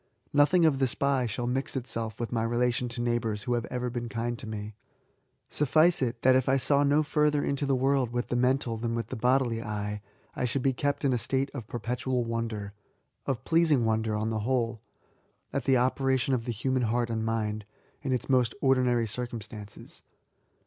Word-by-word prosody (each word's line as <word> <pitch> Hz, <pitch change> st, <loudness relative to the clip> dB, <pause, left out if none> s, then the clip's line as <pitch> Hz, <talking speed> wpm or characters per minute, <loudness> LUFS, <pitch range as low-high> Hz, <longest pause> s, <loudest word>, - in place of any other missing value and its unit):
Nothing 150 Hz, +4 st, +5 dB
of 145 Hz, -4 st, +3 dB
the 135 Hz, -, +3 dB
spy 135 Hz, 0 st, +1 dB
shall 120 Hz, +3 st, -3 dB
mix 130 Hz, +4 st, -2 dB
itself 115 Hz, -3 st, -3 dB
with 120 Hz, -, -2 dB
86 -, -, -7 dB
B88ATS. -, -, 0 dB
my 110 Hz, -, +1 dB
relation 120 Hz, +1 st, 0 dB
to 120 Hz, 0 st, -4 dB
neighbours 115 Hz, -3 st, -1 dB
who 125 Hz, -, -1 dB
have 120 Hz, -1 st, -1 dB
ever 125 Hz, -1 st, -3 dB
been 120 Hz, -1 st, -4 dB
kind 120 Hz, +1 st, -2 dB
to -, -, -6 dB
me. 105 Hz, 0 st, -5 dB, 0.7 s
Suffice 155 Hz, +4 st, +3 dB
it^ 125 Hz, -2 st, 0 dB
that 130 Hz, 0 st, +6 dB
if 130 Hz, 0 st, +2 dB
I 135 Hz, -, +4 dB
saw 140 Hz, +2 st, +2 dB
no 145 Hz, +2 st, +3 dB
further 150 Hz, -1 st, +2 dB
into 140 Hz, 0 st, -1 dB
the 135 Hz, -, +2 dB
world 135 Hz, -1 st, +2 dB
with 120 Hz, +1 st, -3 dB
the -, -, 0 dB
mental 125 Hz, -1 st, +1 dB
than 115 Hz, +1 st, -2 dB
with 115 Hz, -, -3 dB
the -, -, -4 dB
bodily 125 Hz, -1 st, +1 dB
eye, 105 Hz, -1 st, -4 dB, 0.3 s
I -, -, -1 dB
should 125 Hz, +2 st, -1 dB
be 135 Hz, -, +2 dB
kept 145 Hz, +2 st, -1 dB
in 135 Hz, -, +3 dB
a 120 Hz, -, +1 dB
state 135 Hz, +3 st, -1 dB
of 120 Hz, -7 st, -6 dB
perpetual 125 Hz, +2 st, -2 dB
wonder, 115 Hz, -3 st, -3 dB, 0.5 s
(of 135 Hz, -4 st, -2 dB
pleasing 160 Hz, -7 st, +3 dB
wonder, 110 Hz, -1 st, 0 dB
on 110 Hz, +1 st, -1 dB
the 110 Hz, -, -1 dB
whole,) 115 Hz, -1 st, -1 dB, 0.7 s
at -, -, -2 dB
the 135 Hz, -1 st, +4 dB
operation 130 Hz, +1 st, +1 dB
of 120 Hz, -3 st, -1 dB
the 120 Hz, -, -2 dB
human 130 Hz, +3 st, -1 dB
heart 120 Hz, 0 st, 0 dB
and 110 Hz, -1 st, -1 dB
mind, 110 Hz, -1 st, -1 dB, 0.4 s
in 140 Hz, -3 st, -2 dB
its 125 Hz, -, -1 dB
most 125 Hz, -4 st, +2 dB
ordinary 125 Hz, -3 st, +3 dB
circumstances. 110 Hz, -2 st, -7 dB
120 Hz, 205 wpm, -28 LUFS, 115-135 Hz, 0.7 s, that